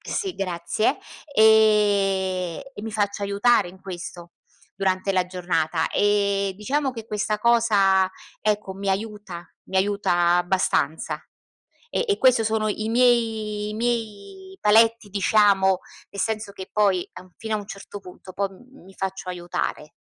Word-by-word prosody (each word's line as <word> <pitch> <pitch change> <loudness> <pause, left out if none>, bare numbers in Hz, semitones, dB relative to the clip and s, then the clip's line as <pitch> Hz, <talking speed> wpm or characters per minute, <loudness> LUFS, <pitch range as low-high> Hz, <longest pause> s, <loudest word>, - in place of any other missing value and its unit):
Sì, 385 -3 -3
grazie, 185 - -1 0.4
ehm, 200 -4 +3
e 205 - -8
mi 225 - -5
faccio 205 -1 -1
aiutare 200 0 +2
in 185 +1 -14
questo 175 -2 -8 0.4
durante 195 0 0
la 185 -1 +1
giornata. 175 -3 -1
E, 200 -1 +1
diciamo, 270 +5 -1
che 225 -2 -8
questa 210 -1 -2
cosa, 205 -5 +3 0.3
ecco, 210 -2 -1
mi 195 0 -5
aiuta 195 -4 -4 0.2
mi 190 - -4
aiuta 185 -3 +2
abbastanza 175 -4 0 0.7
e 485 - -1
e 410 - +1
questo 250 -3 +4
sono 220 0 0
i 215 +1 -2
miei 225 -4 +1
i 210 - -5
miei 240 - -4
paletti, 225 +1 +4
diciamo, 200 -2 +3 0.3
nel 200 - -11
senso 215 -1 -2
che 190 - -9
poi, 200 -4 +2
a 180 - -9
un 185 - -20
fino 220 -1 -3
a - - 0
un 205 - -9
certo 200 0 -9
punto 185 0 -12
poi 195 +2 -4 0.2
mi 195 - -15
faccio 190 -1 -5
aiutare. 175 -3 -4
200 Hz, 145 wpm, -24 LUFS, 190-220 Hz, 0.7 s, questo